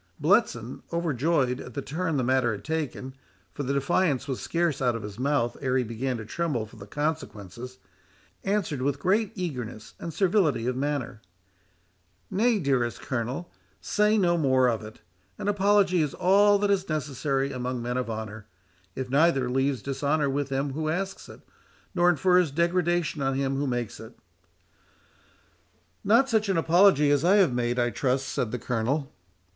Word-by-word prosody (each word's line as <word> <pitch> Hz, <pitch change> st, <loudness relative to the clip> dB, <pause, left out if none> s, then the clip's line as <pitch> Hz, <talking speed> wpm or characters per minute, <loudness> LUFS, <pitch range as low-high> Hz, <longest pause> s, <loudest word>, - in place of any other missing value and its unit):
Bletson, 145 Hz, -, +1 dB
overjoyed 150 Hz, -5 st, 0 dB
at 125 Hz, -, -10 dB
the 140 Hz, -, -2 dB
turn 160 Hz, +2 st, -2 dB
the 130 Hz, -, 0 dB
matter 125 Hz, -2 st, +2 dB
had 100 Hz, -, -7 dB
taken—for 140 Hz, -3 st, -6 dB
the 140 Hz, 0 st, -1 dB
defiance 140 Hz, 0 st, +1 dB
was 135 Hz, -3 st, -3 dB
scarce 170 Hz, -5 st, -1 dB
out 125 Hz, -2 st, +2 dB
of 115 Hz, -, -5 dB
his 105 Hz, +1 st, -8 dB
mouth 135 Hz, -3 st, 0 dB
ere 130 Hz, -1 st, +1 dB
he 130 Hz, -, +2 dB
began 120 Hz, +2 st, -3 dB
to 110 Hz, -, -7 dB
tremble 145 Hz, -3 st, -2 dB
for 110 Hz, -, -16 dB
the 100 Hz, -, -11 dB
consequences—answered 125 Hz, -, -5 dB
with 140 Hz, +1 st, 0 dB
great 195 Hz, +7 st, +1 dB
eagerness 125 Hz, -, -5 dB
and 170 Hz, -, -5 dB
servility 160 Hz, -, +2 dB
of 125 Hz, 0 st, -1 dB
manner,—"Nay, 95 Hz, -, -4 dB
dearest 130 Hz, -, 0 dB
Colonel, 130 Hz, +7 st, -4 dB, 0.3 s
say 210 Hz, +1 st, +2 dB
no 175 Hz, -4 st, +2 dB
more 130 Hz, -3 st, +3 dB
of 115 Hz, -2 st, -1 dB
it—an 90 Hz, -, -11 dB
apology 200 Hz, -3 st, +3 dB
is 150 Hz, -3 st, -2 dB
all 205 Hz, +2 st, +4 dB
that 205 Hz, 0 st, +1 dB
is 195 Hz, -2 st, 0 dB
necessary 140 Hz, -2 st, -1 dB
among 125 Hz, -1 st, -3 dB
men 120 Hz, +1 st, -3 dB
of 125 Hz, -2 st, -2 dB
honour—it 105 Hz, 0 st, -8 dB
neither 140 Hz, -4 st, +3 dB
leaves 135 Hz, -2 st, 0 dB
dishonour 140 Hz, +1 st, 0 dB
with 140 Hz, 0 st, -2 dB
him 135 Hz, 0 st, -1 dB
who 155 Hz, +2 st, -2 dB
asks 190 Hz, +4 st, -3 dB
it, -, -, -12 dB, 0.5 s
nor 175 Hz, 0 st, +4 dB
infers 180 Hz, 0 st, +3 dB
degradation 170 Hz, -1 st, 0 dB
on 135 Hz, 0 st, 0 dB
him 135 Hz, 0 st, 0 dB
who 140 Hz, +1 st, -1 dB
makes 120 Hz, -3 st, -3 dB
it." -, -, -12 dB, 1.9 s
"Not 235 Hz, +6 st, +4 dB
such 220 Hz, -5 st, +1 dB
an 190 Hz, -, +2 dB
apology 165 Hz, -3 st, +5 dB
as 145 Hz, 0 st, +2 dB
I 185 Hz, +4 st, +5 dB
have 185 Hz, -10 st, +4 dB
made, 120 Hz, 0 st, -1 dB
I 120 Hz, -1 st, +1 dB
trust," 130 Hz, +3 st, 0 dB
said 120 Hz, -, -1 dB
the 125 Hz, -, -2 dB
Colonel. 130 Hz, +5 st, -2 dB
135 Hz, 160 wpm, -26 LUFS, 120-170 Hz, 1.9 s, apology